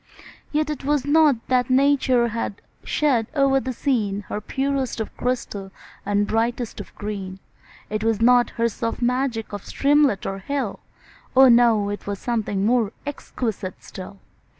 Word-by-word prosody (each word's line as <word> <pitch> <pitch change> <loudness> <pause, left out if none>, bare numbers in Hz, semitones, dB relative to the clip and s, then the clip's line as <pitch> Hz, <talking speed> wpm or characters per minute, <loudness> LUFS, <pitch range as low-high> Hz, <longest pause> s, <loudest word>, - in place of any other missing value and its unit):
Yet 305 0 0
it 295 - -6
was 285 -1 +1
not 300 -1 +5
that 250 -1 +2
Nature 260 -2 +3
had 225 -2 -4 0.2
shed 255 -7 +1
o'er 275 -1 +4
the 260 0 -4
scene 225 -6 -1
Her 210 - -3
purest 270 +1 -2
of 220 - -5
crystal 210 -6 -3 0.3
and 205 0 +1
brightest 235 +2 -1
of - - -10
green; 195 -3 -5 0.6
'Twas 220 0 0
not 245 +1 +5
her 230 0 +3
soft 230 +2 -3
magic 245 -3 -1
of 205 - -5
streamlet 285 -7 +2
or 195 0 -3
hill, 260 0 -3 0.6
Oh! 265 0 +8
no, 235 -4 +5
it 205 0 -6
was 200 0 -2
something 210 -4 -1
more 230 -2 +2
exquisite 225 -9 -4
still. 190 +2 -9
235 Hz, 150 wpm, -23 LUFS, 210-270 Hz, 0.6 s, Oh